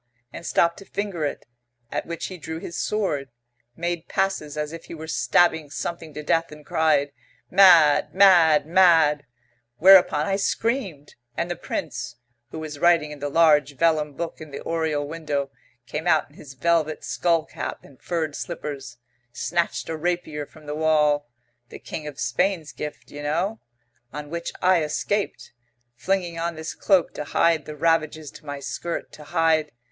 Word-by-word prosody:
and 170 - -7
stop 170 0 +2
to - - -12
finger 195 -5 -3
it? 145 - -4 0.5
At - - -3
which 170 -1 -4
he 185 -2 -7
drew 160 0 -6
his 170 +1 -7
sword, 170 -11 -1 0.5
made 170 0 -3
passes 155 -6 -1
as 150 +1 -3
if 165 - -9
he - - -8
were 160 0 -8
stabbing 160 -1 +2
something 165 +1 -5
to 150 - -5
death, 165 +2 +1
and 150 -1 -12
cried, 150 -3 +2 0.4
'Mad! 175 -6 +6
Mad! 170 -6 +6
Mad!' 160 -5 +4 0.5
Whereupon 180 -3 +6
I 195 +2 0
screamed, 200 - -2 0.2
and 175 - -1
the - - -2
Prince, 120 -8 -5 0.3
who - - -8
was 155 -2 -6
writing 170 -3 +3
in 150 - -9
the 145 0 -3
large 150 -2 +4
vellum 155 -3 +2
book 170 +2 -5
in 155 - -9
the 140 - -7
oriel 160 -3 -1
window, 145 -3 -3 0.3
came 155 +7 -4
out 160 -3 +2
in - - -22
his 140 -2 -12
velvet 155 +2 +1
skull 170 -2 +1
cap - - -6
and 135 -2 -18
furred 160 -4 -2
slippers, 140 -7 -6 0.3
snatched 170 +7 -1
a 165 - -3
rapier 155 -3 -2
from 155 -1 -17
the 150 - -4
wall 150 -3 +2 0.4
the - - -9
King 155 -2 -7
of 145 -2 -8
Spain's 155 +7 0
gift, 150 -1 -8
you 145 - -8
know 170 +9 -1 0.5
on 150 +1 -7
which 170 0 -4
I 180 -2 +5
escaped, 200 +6 -2 0.4
flinging 175 +3 -1
on 170 0 -2
this 160 0 -5
cloak 190 -4 +2
to - - -4
hide 160 0 +2
the 150 - -7
ravages 155 -1 0
to - - -15
my 145 0 -5
skirt 140 +5 -5
to 150 - -12
hide.... 160 -2 +2
160 Hz, 170 wpm, -24 LUFS, 150-170 Hz, 0.5 s, Mad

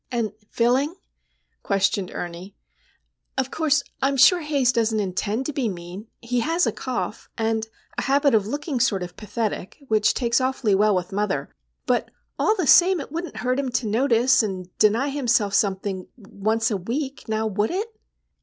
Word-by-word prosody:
"And 230 -4 -1 0.2
filling?" 260 +7 +1 0.7
questioned 195 -1 0
Ernie. 175 +3 -7 0.8
"Of 265 0 -1
course, 305 -2 +2 0.2
I'm 275 +1 +1
sure 355 +7 +7
Haze 285 -5 +2
doesn't 225 -2 +1
intend 205 +5 -2
to 300 - -3
be 260 -5 0
mean. 180 +3 -8
He 245 +1 -1
has 330 +8 +1
a - - +1
cough, 245 -3 -4
and 220 -1 0 0.3
a - - 0
habit 280 0 +3
of 210 -2 +3
looking 290 +2 -3
sort 210 -7 +1
of 175 - -8
pathetic, 215 -3 -4
which 215 -1 +3
takes 235 0 +1
awfully 255 -5 +1
well 205 +1 +4
with 180 +1 -2
mother; 205 0 -2 0.3
but, - - 0 0.3
all 430 - +3
the 370 -6 -1
same, 360 +5 +6
it 280 - -7
wouldn't 335 +2 -5
hurt 255 +2 0
him 275 -2 -1
to 245 - 0
notice, 240 +3 +3
and 185 -4 -5
deny 225 +6 +3
himself 240 -7 +1
something 195 -1 0
once 220 +1 -1
a 205 - +1
week,—now 230 0 -3
would 210 0 0
it?" 430 +5 -3
230 Hz, 165 wpm, -23 LUFS, 205-275 Hz, 0.8 s, sure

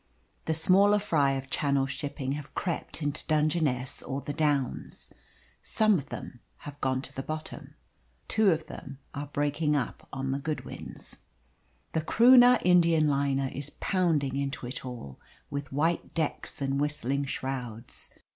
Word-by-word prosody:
The 160 - +1
smaller 195 +5 +5
fry 145 -9 +2
of 135 0 -5
Channel 140 -2 +2
shipping 135 0 -4
have 145 +1 -5
crept 170 -2 -3
into 145 0 -1
Dungeness 150 -4 +1
or 135 - -3
the 145 +1 -5
Downs. 145 -4 -1 0.5
Some 215 -4 +3
of 140 - -10
them 120 - -7 0.3
have 145 0 -9
gone 130 0 0
to - - -7
the 135 - -3
bottom. 155 +3 -6 0.5
Two 215 -2 +4
of 160 -3 +1
them 135 0 -9 0.2
are 145 +1 -4
breaking 145 +2 0
up 130 -5 -3
on 135 0 -2
the 135 - -1
Goodwins. 155 +2 -5 0.8
The 160 - +1
Croonah 245 +6 +7
Indian 170 -3 +5
liner 140 -1 +1
is 140 +1 -4
pounding 155 -8 +1
into 140 -2 -3
it 125 +2 -5
all, 120 - -8 0.3
with 140 0 -4
white 160 +5 0
decks 155 -2 -2
and 135 +1 0
whistling 140 -2 0
shrouds. 125 -4 -5
145 Hz, 145 wpm, -29 LUFS, 135-160 Hz, 0.8 s, Croonah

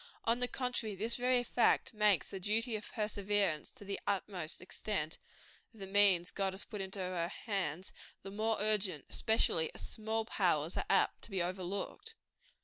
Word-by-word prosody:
On 230 +1 +2
the 250 - +2
contrary, 245 -5 -2
this 220 +5 +1
very 250 0 +2
fact 240 0 +2
makes 210 -4 +3
the 195 - -5
duty 220 +4 +2
of 210 - -6
perseverance 205 -6 0
to 205 - -13
the 200 0 -3
utmost 185 -4 -2
extent 180 -3 -3 0.6
of - - -16
the 195 - -5
means 195 -3 +4
God 195 -1 0
has 190 - 0
put 210 -3 -6
into 190 +1 -3
her 180 -3 -1
hands, 185 -4 -2 0.3
the 195 - -7
more 220 +2 +1
urgent 200 -7 +1
especially 170 -7 +2
as - - -3
small 220 0 -2
powers 170 -6 +1
are - - -2
apt - - +3
to - - -10
be 190 -4 0
overlooked. 190 - -4
200 Hz, 170 wpm, -34 LUFS, 185-220 Hz, 0.6 s, means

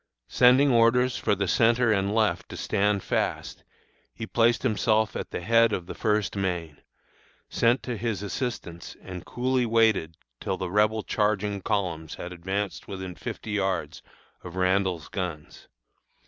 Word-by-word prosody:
"Sending 130 +3 +5
orders 120 +2 +4
for 105 - +1
the 100 0 -1
centre 115 +3 +3
and 100 0 +1
left 110 -2 +1
to - - -8
stand 100 0 0
fast, - - -2 0.5
he 110 - -5
placed 115 0 +2
himself 110 -2 +1
at - - -4
the - - -5
head 115 +4 +4
of 90 -4 -2
the - - -7
First 105 -2 0
Maine, 90 -6 -3 0.7
sent 120 +3 +2
to 125 - -3
his 110 -2 -3
assistance, 100 -7 -5
and 90 -2 -8
coolly 125 0 0
waited 110 -8 +2 0.2
till 95 - -3
the 95 -2 -4
Rebel 105 +2 +2
charging 105 -1 0
columns 90 -7 -2
had 90 +1 -7
advanced 95 +3 -4
within 95 -2 -6
fifty 110 - -7
yards 90 -8 -2 0.4
of 90 0 -9
Randall's 95 -3 0
guns. 90 -6 -6
105 Hz, 150 wpm, -26 LUFS, 90-115 Hz, 0.7 s, Sending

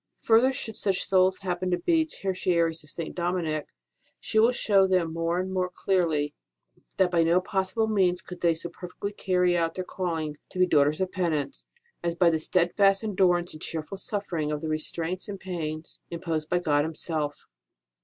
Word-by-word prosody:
Further, 235 +4 +5
should 225 -4 -4
such 195 -2 0
souls 190 0 +4
happen 185 -1 -2
to 180 - +2
be 320 - +2
Ter 195 -10 -3
tiaries 170 -3 +1
of 150 - -18
St. 165 +2 -5
Dominic, 170 -4 -1 0.5
she 220 - 0
will 230 +3 +6
show 200 -5 +3
them 180 -4 +1
more 165 +1 0
and 190 +1 -3
more 185 -1 0
clearly 165 -7 0 0.6
that 185 -2 +3
by 170 -2 +3
no 165 +2 +4
possible 190 +4 -1
means 190 -5 +1
could 180 -1 -9
they 170 -1 +3
so 170 +2 -6
perfectly 180 +4 -6
carry 180 -3 +2
out 165 -1 0
their 185 - -2
calling 165 -5 -3
to - - -10
be 185 - +5
daughters 150 -1 +3
of 185 -1 0
penance, 170 - -2 0.4
as 170 -1 -1
by 170 -1 +4
the 160 - 0
steadfast 195 +5 +3
endurance 180 -4 +2
and 155 - -11
cheerful 165 +4 -5
offering 175 -7 -2
of 150 -1 -2
the 160 - -3
restraints 165 +3 -3
and 200 -1 -5
pains 160 -4 -5
imposed 165 -2 -3
by 180 - +2
God 150 -4 +2
Himself. 155 -2 -3
180 Hz, 185 wpm, -27 LUFS, 165-190 Hz, 0.6 s, will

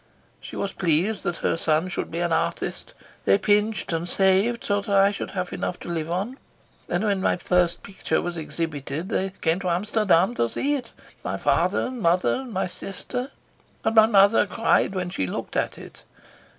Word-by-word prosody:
She - - -9
was 200 - -3
pleased 180 +5 +1
that 175 -3 -1
her - - +2
son 160 +1 +1
should 180 - -3
be 170 +1 -3
an 170 -1 +1
artist. - - -2 0.3
They 100 - +5
pinched 210 - +1
and 165 +2 -2
saved 195 +6 +3
so 205 0 +1
that 200 - -9
I 195 0 +5
should 200 - -5
have 180 -1 -2
enough 180 - -3
to - - -7
live 165 -2 -2
on, 200 +10 -3 0.5
and 175 +4 0
when 200 -3 +1
my - - +2
first 175 -1 +1
picture 195 - -2
was 175 0 -3
exhibited 160 0 -4
they 195 -3 -1
came 165 +2 +1
to 185 -2 -2
Amsterdam 195 +1 +2
to 115 - 0
see 285 - 0
it, 255 -5 -3 0.3
my - - -2
father - - +2
and 255 -2 -5
mother 175 0 +2
and 260 -2 -7
my 190 -2 -1
sister, 245 +8 -5 0.6
and 220 - +2
my 220 -1 +7
mother 205 0 +5
cried 200 0 +1
when 180 -1 -2
she 95 - -2
looked - - -5
at - - -1
it." - - -12
190 Hz, 190 wpm, -24 LUFS, 170-210 Hz, 0.6 s, my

